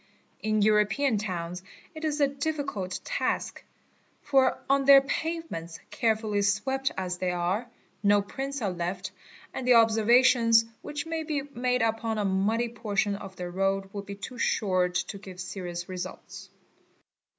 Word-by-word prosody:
In 215 -1 +1
European 215 +3 +3
towns 180 -3 -4 0.3
it 315 0 -9
is 305 -1 -1
a 285 - +5
difficult 280 -10 -3
task, - - -2 0.6
for 270 -3 +3
on 275 0 +3
their 275 0 +9
pavements, 275 - -4
carefully 220 -3 +1
swept 265 +7 +1
as 180 -1 -3
they 185 - 0
are, 180 +6 -1 0.3
no 205 0 +4
prints 270 +5 -5
are 200 - 0
left 180 +2 -4 0.4
and 250 - -4
the 250 - +7
observations 230 +1 +5 0.2
which 295 +1 -5
may 325 0 -3
be 300 -3 -2
made 250 0 +1
upon 225 0 0
a 210 - 0
muddy 210 +5 +1
portion 210 -3 -1
of 195 -1 -9
the 180 -1 -5
road 195 +1 -1
would 200 -1 -6
be 200 - -6
too 235 +4 -8
short 185 -6 +1
t¢ 195 +2 -2
give 185 -2 -10
serious 175 -2 -5
results. 185 -1 -7
215 Hz, 150 wpm, -28 LUFS, 190-265 Hz, 0.6 s, their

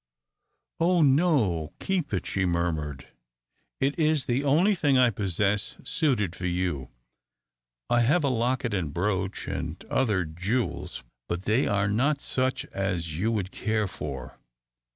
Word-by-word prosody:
"Oh, 170 0 +4
no, 135 - +2
keep 185 -6 -1
it!" 95 - -1
she 100 - -1
murmured. 85 -5 -1 0.7
"It 140 +4 0
is 155 -3 +2
the 130 +3 0
only 165 +9 +4
thing 145 -8 +2
I 125 -2 +5
possess 100 0 0
suited 110 - 0
for 90 +1 -3
you. 85 -8 -2 1.0
I 120 - +3
have 150 +8 +3
a 140 - +2
locket 120 -1 0
and 85 -7 -1
brooch 95 +2 -1
and - - -3
other 105 -9 +2
jewels, 90 - -3 0.2
but 85 +1 -3
they 110 +6 +2
are 100 -1 +1
not 135 +8 +1
such 130 -1 -1
as 85 -5 -2
you 110 +4 +1
would 100 -4 -2
care 110 -1 0
for." 70 -8 -7
105 Hz, 140 wpm, -27 LUFS, 90-135 Hz, 1.0 s, I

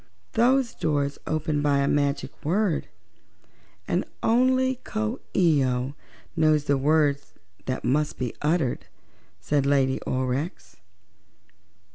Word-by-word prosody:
"Those 250 +1 +2
doors 145 -2 -1
open 155 -1 -1
by 145 -1 +2
a 140 0 +1
magic 145 0 0
word, 180 +2 0 1.0
and - - +1 0.2
only 255 +2 +2
Coo 220 +3 -3 0.2
ee 160 -6 +4
oh 125 +1 -1 0.4
knows 155 -2 +3
the 140 -1 +2
word 145 0 +2 0.5
that 130 0 -2
must 150 +4 +1
be 125 -3 -3
uttered," 150 -4 0 0.5
said 145 -2 0
Lady 135 -2 +2
Aurex. 130 +6 -3
150 Hz, 110 wpm, -25 LUFS, 140-180 Hz, 1.0 s, ee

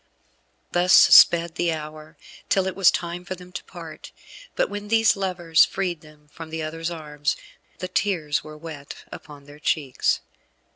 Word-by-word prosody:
Thus 180 +1 +2
sped 170 -1 +7
the 175 -1 0
hour, 155 0 -8 0.3
till 190 -1 +2
it 190 - -3
was 195 -3 +5
time 175 +1 -3
for 185 +1 -6
them 180 0 -14
to - - -7
part; - - -11 0.4
but - - +1
when 205 0 -7
these 225 0 +3
lovers 175 -4 +2
freed 180 -4 -2
them 150 -1 -19
from 165 0 -10
the 160 0 -4
other's 165 +2 -4
arms, 150 -3 -3 0.4
the 185 - -5
tears 175 -6 -1
were 155 0 -11
wet 150 -3 -9 0.2
upon 145 -1 -11
their 145 +1 -14
cheeks. 145 -3 0
165 Hz, 160 wpm, -23 LUFS, 155-180 Hz, 0.4 s, sped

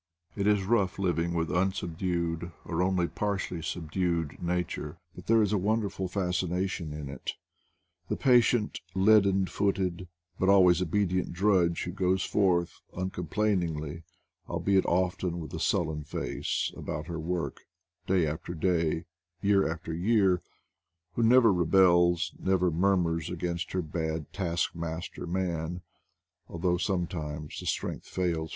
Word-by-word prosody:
It 100 0 0
is 105 -2 +3
rough 100 -3 +1
living 85 -2 0
with 80 -2 -1
unsubdued, 85 -1 -1
or 85 +1 -1
only 90 -1 +2
par 100 +1 -1
tially 90 -4 -4
subdued, 85 -1 -2
Nature, 85 -3 -2 0.2
but - - -12
there 115 -1 +5
is 105 0 0
a 105 - +2
wonderful 100 -1 0
fascination 90 -2 -1
in 75 -1 -6
it. 70 -2 -5 0.8
The - - 0
patient, 120 -4 +3 0.2
leaden 100 -1 +5
footed, 95 -2 -1 0.3
but 95 - +2
always 90 -2 +6
obedient 90 +1 0
drudge, 90 -2 +2
who 90 - -4
goes 95 0 +1
forth 90 -4 +1 0.2
uncom 95 0 -4
plainingly, 85 -7 -1 0.5
albeit 95 -1 +2
often 90 -1 0
with 80 - -8
a - - -3
sullen 80 -3 0
face, 75 - -2
about 75 +1 -5
Jter 80 -1 -5
work, 85 +1 -3 0.5
day 90 -3 +3
after 80 +3 -4
day, 85 -1 0 0.3
year 100 -3 +3
after 80 0 -5
year; 95 0 +3 0.7
who - - -1
never 115 -2 +6
rebels, 85 0 +4
never 95 -2 +2
murmurs 85 -2 +1
against 85 0 -3
her 90 -1 0
bad 80 -1 -3
task 85 -4 -1
master 85 +1 -5
Man, 85 -1 -2 0.6
although 90 +1 0
sometimes 80 -5 -3
the - - -7
strength - - -3
fails 85 -3 -1
90 Hz, 135 wpm, -29 LUFS, 85-95 Hz, 0.8 s, always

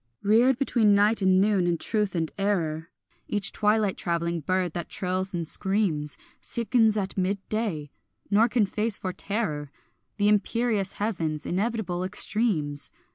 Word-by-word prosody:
Reared 235 +5 +4
between 230 -6 +3
night 210 +2 +3
and 190 -1 +4
noon 195 -3 +2
and 170 -2 0
truth 210 -4 -1
and 160 -2 -1
error, 165 -6 -1 0.4
Each 200 -1 0
twilight 210 -2 +1
travelling 170 -1 -1
bird 180 +2 -1
that 175 - -5
trills 185 +1 -2
and 170 -3 -3
screams 175 -7 -1 0.2
Sickens 225 -1 +2
at 195 -1 -2
midday, 190 -5 -2 0.4
nor 215 +3 +5
can 230 -3 +2
face 210 +2 -2
for 185 -1 -4
terror 165 -10 -3 0.5
The 205 -1 +2
imperious 210 0 +1
heaven's 165 -8 -3
inevitable 190 -2 -2
extremes. 185 -7 +1
195 Hz, 135 wpm, -26 LUFS, 175-215 Hz, 0.5 s, nor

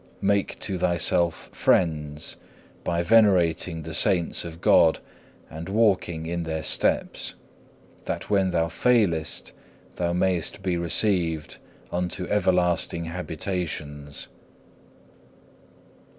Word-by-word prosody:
Make 100 0 +1
to 95 -3 -2
thyself 85 -1 +1
friends, 75 -4 0 0.5
by 85 0 0
venerating 90 -5 +3
the 80 +1 -7
saints 90 0 +2
of 85 -1 -8
God 80 -3 +5 0.5
and 80 +3 -8
walking 95 -6 +1
in 85 +1 -2
their 80 -1 -3
steps, - - 0 0.7
that - - -4
when 100 -2 +2
thou 85 -2 +1
failest, 85 -4 +1 0.5
thou 85 -1 0
mayest 90 +2 0
be 90 -2 0
received 85 -2 0 0.4
into 90 0 -2
everlasting 90 -4 +1
habitations. 80 -4 -4
85 Hz, 95 wpm, -25 LUFS, 80-95 Hz, 0.7 s, God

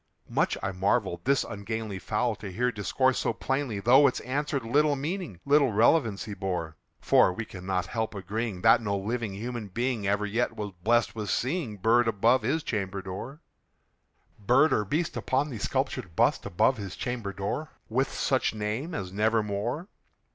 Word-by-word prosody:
Much - - +1
I - - -1
marvelled 95 -1 0
this 140 0 +3
ungainly 105 -1 -5
fowl 110 +3 -1
to 100 -3 -7
hear 125 +6 0
discourse 130 +4 +1
so - - 0
plainly, 135 -6 -2
Though 130 +7 +6
its 130 - -1
answer 140 +2 -1
little 145 +5 +2
meaning 150 - -4
little 140 -2 +4
relevancy 110 -2 +2
bore; 90 -5 -3 0.2
For - - +4
we 110 +5 -5
cannot 90 -2 -3
help 110 -2 -3
agreeing 100 0 -4
that 115 +1 +6
no 100 -2 -1
living 110 0 -3
human 115 +1 -5
being 115 +1 -2
Ever 100 +1 +1
yet 115 +2 -1
was 105 -2 -4
blessed 120 +4 +2
with 105 -3 -4
seeing 130 - -1
bird 115 +4 +3
above 115 +4 +3
his 145 +8 0
chamber 100 -3 -3
door 115 - -7 1.0
Bird 130 +9 +4
or 105 - +1
beast 155 - -1
upon 140 +3 0
the 115 - -5
sculptured 85 -3 -2
bust - - +2
above 130 +9 +2
his 100 -3 -6
chamber 120 -5 -3
door, 100 - -3 0.2
With 130 +4 0
such 130 -4 0
name 110 +11 -3
as 95 -2 -4
"Nevermore." 110 - 0
110 Hz, 165 wpm, -28 LUFS, 100-130 Hz, 1.0 s, Though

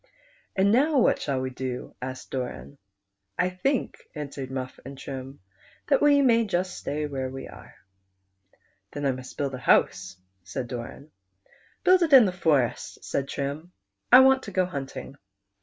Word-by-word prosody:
" - - -35
And 195 +1 +4
now 285 +6 +3
what 245 - +3
shall 140 -3 -1
we 130 0 -3
do? 125 -1 -5
" - - -47
asked 130 +1 -7
Doran. 130 +2 -5 0.3
" 100 0 -54
I - - -4
think," 250 +9 -1 0.2
answered 140 -3 -6
Viwii 130 -1 -5
and 135 +1 -9
Trim, 135 -3 -8 0.2
" - - -29
that 275 - +4
wc 285 -1 +5
may 230 -2 +4
just 185 -3 -2
stay 150 +1 -3
where 135 -3 -3
we 135 +1 -7
are." - - -14 0.6
" 95 +1 -40
Then 145 -1 -4
I 135 - +3
must 130 0 -8
build 140 -2 -2
a 130 - -5
house," 95 -6 +2 0.3
said 125 +6 -5
Doran. 125 +5 -8 0.3
" - - -32
Build 370 0 +5
it 325 -4 +2
in 255 -4 +10
the 190 - 0
forest," 150 -9 0
said 140 - -2
Trim; 145 +7 -5 0.2
" 100 0 -53
I 250 +2 +10
want 265 0 +5
to 205 - -8
go 185 -1 +2
hunting." 140 -4 -7
140 Hz, 190 wpm, -26 LUFS, 130-195 Hz, 0.6 s, in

